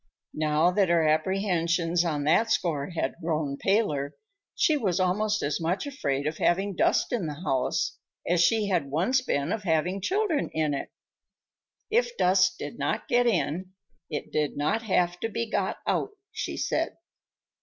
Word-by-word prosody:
Now 155 +3 +2
that 190 -1 +2
her 165 -2 +3
apprehensions 170 0 +1
on 150 -4 -1
that 170 +10 +3
score 160 -9 0
had 165 -6 -2
grown 155 -4 -1
paler, 150 -9 0 0.4
she 310 - +3
was 195 - 0
almost 210 +4 +1
as 145 +3 -1
much 175 - -1
afraid 140 - -2
of 155 +1 -2
having 195 +2 +1
dust - - +2
in 205 -9 -1
the 150 - -4
house 130 -7 0 0.3
as 175 0 +3
she 220 +1 +3
had 170 -7 0
once 185 - +2
been 140 - -1
of 220 - -1
having 180 +1 0
children 380 - 0
in 155 -2 0
it. 140 - -4 1.0
If 485 +1 +1
dust 180 0 +3
did 145 - -7
not 145 +10 -1
get 245 0 +3
in, 185 -3 -1 0.4
it 150 - -5
did 150 -2 -1
not 155 +10 +1
have 180 -5 +1
to 225 - -2
be 230 +2 -2
got - - -1
out, - - 0 0.2
she - - -4
said. - - -1
175 Hz, 165 wpm, -27 LUFS, 155-210 Hz, 1.0 s, her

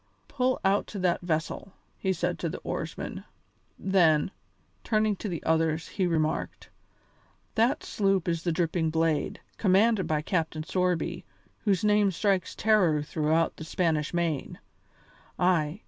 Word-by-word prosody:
Pull 255 -2 0
out 195 +1 +2
to 210 - -7
that 180 -2 +1
vessel!" 170 +2 -3 0.3
he 190 - 0
said 175 -1 -1
to 170 - -2
the - - -5
oarsmen. - - -5 0.5
Then, 175 -4 +3 0.5
turning 215 -1 +1
to 210 - -4
the 170 -3 -4
others, 160 0 +1
he 185 -3 0
remarked: 160 -2 -2 0.8
"That 230 +3 +2
sloop 195 -4 0
is 165 -1 0
the 170 - 0
Dripping 165 -1 0
Blade, 160 -1 0 0.2
commanded 205 +1 +3
by 150 -1 0
Captain 160 -2 -1
Sorby, 180 +1 -1 0.4
whose 195 -3 +2
name 210 -1 +4
strikes 190 0 0
terror 180 -8 +3
throughout 160 +2 0
the - - -7
Spanish 160 -2 0
Main. 170 -5 -2 0.8
Ay! 175 -1 +1
175 Hz, 135 wpm, -28 LUFS, 160-195 Hz, 0.8 s, name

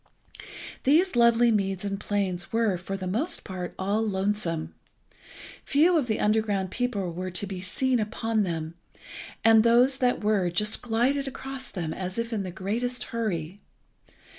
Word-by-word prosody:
These 320 +5 +3
lovely 235 0 +5
meads 195 -2 0
and 195 -1 -3
plains 190 -4 -2
were, 225 -4 +2
for 185 +2 -5
the 185 - -5
most 235 - -1
part, 185 -3 -6
all 200 +3 0
lonesome. 195 -5 -1 0.9
Few 330 +5 +3
of 295 -6 +1
the 220 - -1
underground 210 -3 +1
people 205 -8 -2
were 185 +2 -4
to 180 +3 -3
be 190 -2 -6
seen 250 +7 +1
upon 220 +1 -1
them, 165 -4 -3 0.7
and 225 -1 +7
those 245 +3 +5
that 250 -4 +1
were 205 -4 +2
just 210 +5 +1
glided 250 +4 0
across 270 -1 -6
them 170 -5 -4
as 185 +1 -5
if 230 0 -2
in 215 - -1
the 190 - -4
greatest 225 +7 -2
hurry. 195 -5 -3
210 Hz, 155 wpm, -26 LUFS, 185-240 Hz, 0.9 s, and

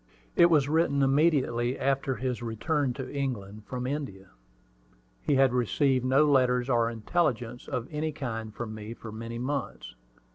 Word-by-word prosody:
It 170 - +7
was 150 -5 +3
written 145 -2 +2
immediately 135 -4 +2
after 135 0 0
his 125 -2 -3
return 120 +5 -1
to 130 +2 -7
England 110 -7 -4
from 125 -1 -4
India. 125 -9 -5 0.9
He 145 - +1
had 135 -2 +4
received 130 +2 +2
no 135 +4 +4
letters 130 -3 +3
or 115 -1 +3
intelligence 120 0 -1
of 125 -1 -3
any 155 +1 -2
kind 115 -7 -5
from 110 0 -6
me 110 +1 -7
for 115 - -9
many 115 +2 -6
months. 130 - -4
130 Hz, 150 wpm, -28 LUFS, 115-140 Hz, 0.9 s, It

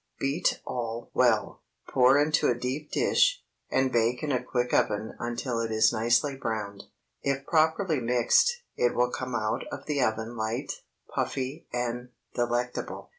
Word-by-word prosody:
Beat 140 +5 0
all 115 -1 -4
well, - - +2 0.3
pour 130 +2 +6
into 150 +1 +3
a 120 - +2
deep 130 +5 -4
dish, - - +2 0.3
and 130 0 +1
bake 120 +2 +1
in 150 - -1
a 125 - +1
quick 125 -1 -2
oven 105 +1 +1
until 120 0 -2
it 115 -1 -1
is 110 +1 +4
nicely 120 +5 +2
browned. 110 -6 -4 0.4
If 140 0 -1
properly 160 0 +2
mixed, 125 - +3
it 120 0 +1
will 125 0 +2
come 130 -1 -4
out 110 -1 -1
of - - -7
the 145 -2 0
oven 110 0 -1
light, 110 +1 -2 0.4
puffy, 135 +4 -3
and 120 0 -3 0.2
delectable. 120 +1 -2
125 Hz, 150 wpm, -28 LUFS, 115-140 Hz, 0.4 s, pour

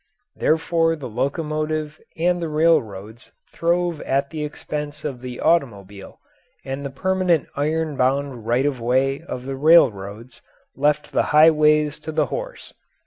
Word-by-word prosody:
Therefore 165 +1 +1
the 145 -5 -7
locomotive 155 +4 -3 0.2
and 175 +2 +1
the 165 - -3
railroads 120 -9 0 0.2
throve 170 -1 0
at 140 +1 -1
the 155 -2 -4
expense 150 0 -6
of 130 -5 -4
the 125 -1 -7
automobile, 100 - -1 0.5
and 135 +1 -5
the 140 - -4
permanent 185 +2 0
iron 155 +1 -1
bound 130 -3 -1
right 120 +4 +2
of 135 -4 -1
way 130 +4 +1
of 130 -7 -7
the 135 0 -4
railroads 120 - +2 0.3
left 150 +2 0
the - - +2 0.2
highways 150 -1 +4
to 160 - -6
the 155 0 +1
horse. - - -6
150 Hz, 140 wpm, -22 LUFS, 130-160 Hz, 0.5 s, highways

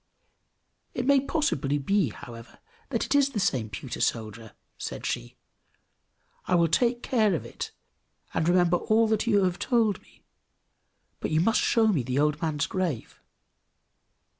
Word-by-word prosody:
"It - - -2
may 280 0 +5
possibly 170 - 0
be, 185 - +1
however, 115 +2 -11 0.3
that - - -1
it - - -1
is 285 -1 +4
the 245 -6 -3
same 125 - 0
pewter 100 - -6
soldier!" 110 -1 -2 0.3
said - - -5
she. - - -3 1.1
"I 180 - +2
will 170 -1 +3
take 240 +7 +1
care 215 -7 +2
of - - -4
it, - - -6 0.6
and 160 - +1
remember 175 -1 +4
all 220 +5 +2
that 220 +1 0
you 205 -4 +4
have 180 -1 0
told 225 -5 +1
me; - - -25 1.0
but - - -3
you 155 - +2
must 220 +7 +3
show 230 -1 +3
me 175 -10 +2
the 125 +2 -3
old 150 +1 +1
man's 155 -3 0
grave!" 175 -11 -3
175 Hz, 155 wpm, -27 LUFS, 140-220 Hz, 1.1 s, may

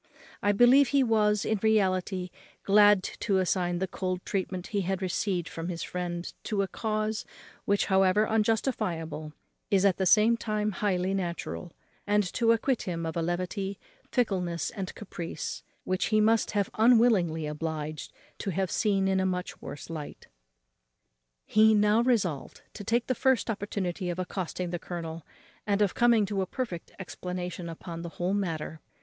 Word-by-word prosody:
I 205 - +3
believe 245 +6 +6
he 275 +1 +3
was, 210 -3 +2
in 220 -2 0
reality, 190 -4 +1 0.3
glad 205 -1 +6 0.2
to 200 -4 +1
assign 180 -1 +1
the 190 +2 -1
cold 185 -1 -3
treatment 185 -2 -2
he 200 - +2
had 190 0 -1
received 185 -1 -1
from 165 +1 -5
his 170 -2 -4
friend 175 -1 -4
to 205 -3 0
a - - -2
cause 215 +1 -2 0.4
which, 200 0 +2
however 190 +2 +4
injustifiable, 200 - -1 0.4
is 200 -2 +3
at 195 -3 +4
the 190 - +1
same 220 +4 +5
time 215 -1 -1
highly 190 -2 0
natural; 175 -1 -4 0.4
and 210 0 +3
to 230 -1 +3
acquit 235 +2 +1
him 165 -2 -2
of 160 - -4
a 170 - 0
levity, 185 +3 -2 0.3
fickleness, 180 - 0
and 195 -3 -6
caprice, 175 -5 -6 0.2
which 185 0 0
he 215 - +2
must 225 +1 +3
have 200 -1 0
been 230 +3 +5
unwillingly 185 -10 +3
obliged 155 0 -4 0.3
to 200 - -3
have 190 -1 -1
seen 195 -1 +1
in 190 0 +2
a 190 - +1
much 180 -1 -4
worse 145 - -8
light. 155 -3 -7 1.2
He 220 0 +5
now 210 +2 +4
resolved 205 - 0
to - - -8
take 235 +4 +1
the 255 - 0
first 255 -1 +2
opportunity 195 -3 -3
of 175 - -3
accosting 180 -1 -3
the 175 - -3
colonel, 165 -2 -6 0.4
and 200 -1 +2
of 205 -3 +2
coming 235 -3 +4
to 195 -1 -1
a 190 - -2
perfect 205 -10 -5
explanation 180 0 -5
upon 165 0 -7
the 170 - -5
whole 180 +2 0
matter. 165 -5 -3
190 Hz, 165 wpm, -28 LUFS, 175-215 Hz, 1.2 s, believe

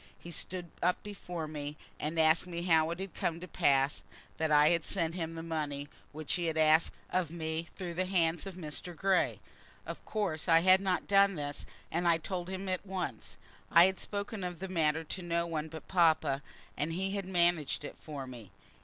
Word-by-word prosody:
He 170 - -10
stood 175 -1 -4
up 180 +1 +1
before 180 -5 -5
me, 150 -1 -5 0.2
and 155 +2 -2
asked 160 +2 +4
me 170 -1 -4
how 160 -2 +4
it 170 +1 -4
had 195 -2 -5
come 165 0 -1
to 180 - -8
pass 140 -3 +2 0.4
that 160 -1 0
I 150 0 +6
had 170 -2 +2
sent 165 -4 -1
him 165 -2 -4
the 165 - -5
money 145 -3 -3 0.2
which 155 -1 -2
he 175 - 0
had 160 -1 -1
asked 155 +1 +5 0.2
of 180 -4 +1
me 160 0 -3
through 180 -3 -5
the 185 +2 -1
hands 175 -1 +1
of 190 - -7
Mr. 170 +1 -5
Grey. 190 +2 +2 0.5
Of - - -7
course 190 -8 -2
I 165 0 +7
had 185 +2 +6
not 185 -2 0
done 200 -1 +5
this, 145 -2 -5 0.2
and 175 +1 0
so - - +6
I 165 - +5
told 175 +2 -4
him 190 +1 -4
at 185 -1 -1
once. 180 - -5 0.3
I 170 - +8
had 190 0 0
spoken 205 0 -4
of 180 -1 -4
the 190 - -5
matter 160 -3 +1
to 180 +4 -5
no 170 -1 0
one 160 -2 -3
but 160 0 -9
papa, 160 -6 +3 0.3
and 155 +3 -1
he 190 +3 -1
had 200 -1 -2
managed 175 -5 +2
it - - -7
for 145 -4 -6
me. 120 -6 -10
170 Hz, 205 wpm, -32 LUFS, 155-185 Hz, 0.5 s, I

